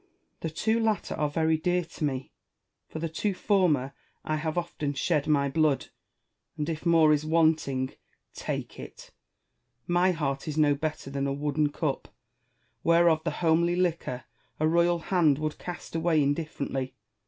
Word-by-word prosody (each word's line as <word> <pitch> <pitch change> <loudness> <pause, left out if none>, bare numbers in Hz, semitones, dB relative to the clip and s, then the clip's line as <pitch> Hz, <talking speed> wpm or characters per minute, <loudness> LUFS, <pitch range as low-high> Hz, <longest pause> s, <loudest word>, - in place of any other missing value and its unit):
Wa.llace. 370 -1 -43
The 160 0 -5
two 220 +1 +3
latter 220 -2 0
are 150 - 0
very 160 +1 +1
dear 180 +2 0
to 165 -1 -8
me! 135 -3 -2 0.6
For - - -7
the 165 +1 -2
two 185 +5 -2
former 165 -11 +2 0.3
I 155 - 0
have 155 +1 -3
often 170 -4 -2
shed 150 0 0
my 140 -2 +3
blood, 150 -1 +1 0.7
and, 150 - -2
if 165 +1 -3
more 160 -2 +6
is 150 0 +1
want 160 0 +3
ing, 130 -1 -2 0.4
take - - -5
it. - - -11 0.7
My 175 +1 +3
heart 140 -3 -2
is 155 0 -3
no 150 -2 +4
better 150 -1 -4
than 140 0 -1
a - - -1
wooden 145 +1 0
cup, 145 -2 -2 0.8
whereof 170 -1 +4
the 165 - 0 0.2
homely 170 +2 +3
liquor 170 -8 -1 0.4
a 155 - +3
royal 170 +1 +3
hand 165 -4 +2
would 155 0 -3
cast 175 -1 -7
away 160 -2 +2
indifferently. 140 -3 -2
155 Hz, 165 wpm, -28 LUFS, 145-170 Hz, 0.8 s, more